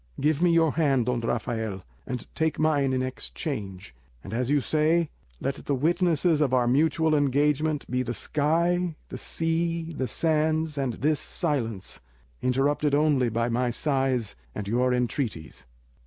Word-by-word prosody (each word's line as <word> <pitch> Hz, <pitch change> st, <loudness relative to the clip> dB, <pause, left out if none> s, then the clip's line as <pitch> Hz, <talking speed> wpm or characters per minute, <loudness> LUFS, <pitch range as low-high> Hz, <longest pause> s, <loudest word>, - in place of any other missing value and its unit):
Give 150 Hz, +2 st, +1 dB
me 175 Hz, -, +5 dB
your 165 Hz, -2 st, +4 dB
hand, 140 Hz, -7 st, +2 dB
Don 125 Hz, -1 st, 0 dB
Rafael, 110 Hz, -4 st, -2 dB, 0.2 s
and 125 Hz, -1 st, -4 dB
take 160 Hz, -1 st, 0 dB
mine 145 Hz, -3 st, +2 dB
in 130 Hz, 0 st, 0 dB
exchange; 120 Hz, -, -5 dB, 0.3 s
and, -, -, -8 dB
as 125 Hz, +2 st, -1 dB
you 145 Hz, 0 st, +4 dB
say, 155 Hz, +3 st, +1 dB, 0.3 s
let 135 Hz, +1 st, -3 dB
the 140 Hz, -, +1 dB
witnesses 165 Hz, +1 st, +2 dB
of 135 Hz, -4 st, +2 dB
our 125 Hz, -1 st, +2 dB
mutual 160 Hz, +4 st, +2 dB
engagement 145 Hz, +1 st, +1 dB
be 125 Hz, 0 st, 0 dB
the 120 Hz, -1 st, -3 dB
sky, 170 Hz, -, +1 dB
the -, -, -6 dB
sea, 165 Hz, 0 st, -1 dB
the 130 Hz, -3 st, -2 dB
sands, 155 Hz, +3 st, +1 dB
and 135 Hz, -5 st, -1 dB
this 150 Hz, +1 st, +1 dB
silence, 115 Hz, -, -2 dB, 0.4 s
interrupted 140 Hz, +3 st, +1 dB
only 145 Hz, -5 st, +3 dB
by 115 Hz, +1 st, 0 dB
my 120 Hz, +1 st, 0 dB
sighs 130 Hz, -, 0 dB, 0.2 s
and 100 Hz, -, -4 dB
your 125 Hz, +4 st, +2 dB
entreaties." 115 Hz, -, -2 dB
140 Hz, 150 wpm, -26 LUFS, 125-155 Hz, 0.4 s, me